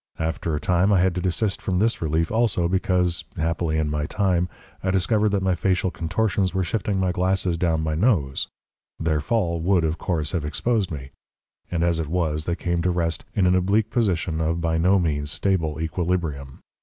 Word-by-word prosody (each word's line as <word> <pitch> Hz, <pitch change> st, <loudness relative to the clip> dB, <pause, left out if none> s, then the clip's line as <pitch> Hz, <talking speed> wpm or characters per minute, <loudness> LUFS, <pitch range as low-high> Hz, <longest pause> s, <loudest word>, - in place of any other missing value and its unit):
After 80 Hz, 0 st, -2 dB
a -, -, -1 dB
time 90 Hz, +5 st, +2 dB
I 100 Hz, -, +4 dB
had 90 Hz, 0 st, +3 dB
to 90 Hz, -, -2 dB
desist 95 Hz, +3 st, -1 dB
from 95 Hz, -2 st, -1 dB
this 115 Hz, +4 st, +1 dB
relief 80 Hz, +1 st, 0 dB
also, 110 Hz, -7 st, +2 dB
because 90 Hz, -1 st, +1 dB
happily 80 Hz, 0 st, 0 dB
in 75 Hz, -1 st, 0 dB, 0.2 s
time 90 Hz, -3 st, +1 dB, 0.3 s
I 95 Hz, -, 0 dB
discovered 105 Hz, +3 st, +2 dB
that 100 Hz, -1 st, 0 dB
my 95 Hz, -1 st, +2 dB
facial 90 Hz, 0 st, 0 dB
contortions 95 Hz, +2 st, 0 dB
were 95 Hz, -, +2 dB
shifting 100 Hz, +2 st, -1 dB
my 95 Hz, -1 st, +1 dB
glasses 95 Hz, -1 st, 0 dB
down 80 Hz, -2 st, 0 dB
my 80 Hz, 0 st, -1 dB
nose. 80 Hz, -, +1 dB, 0.5 s
Their 80 Hz, -2 st, 0 dB
fall 85 Hz, -3 st, 0 dB
would, 90 Hz, 0 st, +2 dB
of 80 Hz, +1 st, -1 dB
course, 80 Hz, -5 st, -1 dB
have 90 Hz, -5 st, -1 dB
exposed 100 Hz, +7 st, 0 dB
me, 70 Hz, -3 st, -7 dB, 0.6 s
and 85 Hz, -1 st, -1 dB
as 85 Hz, -1 st, +1 dB
it 80 Hz, -, -2 dB
was 75 Hz, -2 st, -1 dB
they 85 Hz, -, 0 dB
came 85 Hz, -1 st, -1 dB
to 90 Hz, -, +1 dB
rest 85 Hz, -2 st, -1 dB
in 100 Hz, -, +3 dB
an 90 Hz, -, +4 dB
oblique 100 Hz, +4 st, +2 dB
position 90 Hz, -8 st, 0 dB
of 80 Hz, +1 st, 0 dB
by 80 Hz, -1 st, 0 dB
no 95 Hz, +4 st, +4 dB
means 75 Hz, -5 st, -1 dB
stable 80 Hz, -2 st, -1 dB
equilibrium. 80 Hz, -5 st, -2 dB
85 Hz, 195 wpm, -24 LUFS, 80-95 Hz, 0.6 s, I